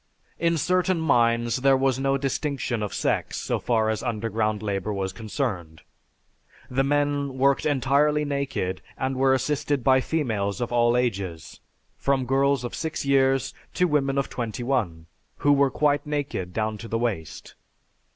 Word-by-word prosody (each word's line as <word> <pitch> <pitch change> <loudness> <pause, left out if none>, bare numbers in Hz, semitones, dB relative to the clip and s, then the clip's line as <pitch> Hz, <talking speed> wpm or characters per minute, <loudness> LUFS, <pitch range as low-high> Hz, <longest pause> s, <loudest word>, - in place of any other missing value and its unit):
In 170 0 +2
certain 185 +2 +1
mines 120 -6 +2
there 135 +1 +4
was 130 -1 +1
no 135 0 +1
distinction 135 -3 -2
of 105 - -3
sex - - -1
so - - -1
far 110 -2 +1
as 110 -1 -1
underground 110 -1 -1
labor 100 0 -2
was 95 -1 -3
concerned. 95 - -4 0.9
The 135 +2 +2
men 145 -1 0
worked 140 +2 +2
entirely 145 +2 +2
naked 140 -10 -2 0.2
and 130 0 -1
were 130 0 +3
assisted 145 0 -1
by 130 +1 +4
females 110 -11 -1
of 120 -1 -3
all 120 0 +3
ages, 95 -10 -3 0.4
from 135 -2 +1
girls 135 0 +2
of 120 - -5
six 160 -3 -3
years 135 -1 +2 0.2
to 180 - +3
women 140 -3 +1
of 140 - +1
twenty 120 -1 -4
one, 100 -12 -1 0.3
who 145 - +3
were 140 -1 +4
quite 145 0 +1
naked 145 -11 -3
down 110 +2 -2
to 115 - -8
the 115 - -1
waist. 110 -10 -4
130 Hz, 155 wpm, -25 LUFS, 110-140 Hz, 0.9 s, there